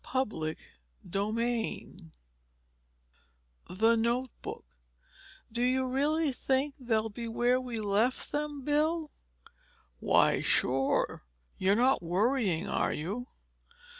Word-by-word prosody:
Chapter 210 -12 -1 0.6
XII 215 -4 -2 1.6
THE 225 +5 +3
NOTEBOOK 235 +2 -2 0.9
"Do 235 +2 -2
you 260 +1 +2
really 290 +4 +1
think 270 +3 0
they'll 225 -3 0
be 230 +3 -6
where 240 +2 +2
we 245 -3 -4
left 215 +4 0
them, 295 -2 -3
Bill?" 305 +1 +1 0.9
"Why - - +3
sure! 135 +1 +1 0.4
You're 190 +2 +3
not 255 +4 +3
worrying, 195 +1 +1
are - - 0
you?" 205 +11 -4
240 Hz, 95 wpm, -30 LUFS, 205-260 Hz, 1.6 s, THE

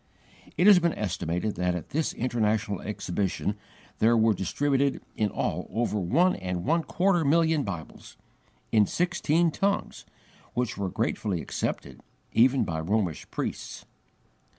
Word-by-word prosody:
It 175 - +3
has 200 -3 +8
been 170 -2 0
estimated 90 0 -2
that 90 0 0
at 90 - -6
this 155 +1 0
International 110 -5 0
Exhibition 100 0 -2 0.4
there 115 +1 +4
were 110 0 +4
distributed 135 +8 0 0.2
in 105 -1 +1
all - - -2
over 110 0 -1
one 165 - +3
and 90 +1 -4
a 165 +3 +3
quarter 175 +1 +1
million 160 +1 +3
Bibles, 90 - -7 0.5
in 105 -3 +4
sixteen 175 -2 +1
tongues, 200 +5 -2 0.5
which 120 -1 -1
were 100 -2 -2
gratefully 95 0 -1
accepted, - - -4 0.3
even 130 +3 +4
by 80 -2 -3
Romish 90 0 -1
priests. - - -5
110 Hz, 130 wpm, -27 LUFS, 95-155 Hz, 0.5 s, has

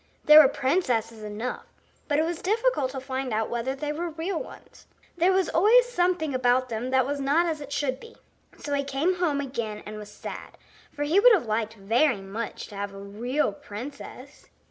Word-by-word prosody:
There 300 +1 +10
were 285 - +6
princesses 250 -6 0
enough, 215 +4 -5 0.4
but 290 - +1
it 315 - +2
was 340 0 -4
difficult 430 - +1
to 265 0 -5
find 260 -1 -4
out 220 0 -1
whether 240 +3 -2
they 295 +2 -3
were 340 +3 -3
real 330 +3 -3
ones. - - -13 0.3
There 350 +2 +3
was 375 -1 +2
always 475 +8 +5
something 355 - 0
about 255 0 +2
them 230 +2 -3
that 260 -1 +3
was 285 +1 -3
not 285 +5 +2
as 320 -3 -2
it 285 -1 -9
should 275 -2 -1
be. 460 0 -14 0.4
So 290 - -5
he 280 0 +1
came 280 +7 0
home 320 -6 0
again 235 -6 -4
and 215 0 -7
was 210 -1 -9
sad, - - -9 0.3
for 290 - -4
he 315 +7 +3
would - - +7
have 385 - +2
liked 220 0 -2
very 225 +4 +2
much 205 +4 -6
to 205 - -11
have 200 0 -5
a - - -9
real 225 +7 -1
princess. 260 +6 -10
275 Hz, 200 wpm, -26 LUFS, 230-325 Hz, 0.4 s, There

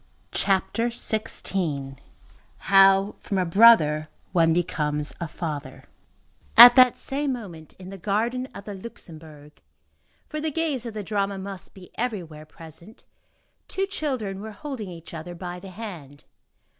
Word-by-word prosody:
CHAPTER 200 +4 0
XVI—HOW 195 - 0
FROM 195 - -3
A 185 - +1
BROTHER 165 -6 +5 0.2
ONE 165 -3 +3
BECOMES 150 -3 -1
A 170 - -2
FATHER 155 -3 -6 0.7
At 240 +1 +12
that 255 -2 +6
same 275 0 -2
moment, 175 - -9
in 185 0 -10
the 195 - -9
garden 230 +7 -1
of 200 - -9
the 205 - -6
Luxembourg,—for 165 - -12
the 315 - -1
gaze 295 -6 -2
of 225 - -8
the 210 - -4
drama 200 -1 -2
must 195 0 -8
be 185 -2 -14
everywhere 170 -11 -4
present,—two 170 - -9
children 260 - -4
were 220 0 -8
holding 245 -4 -7
each 170 -1 -11
other 165 +2 -7
by 180 0 -7
the 195 - -11
hand. 175 -9 -9
195 Hz, 130 wpm, -24 LUFS, 165-230 Hz, 0.7 s, At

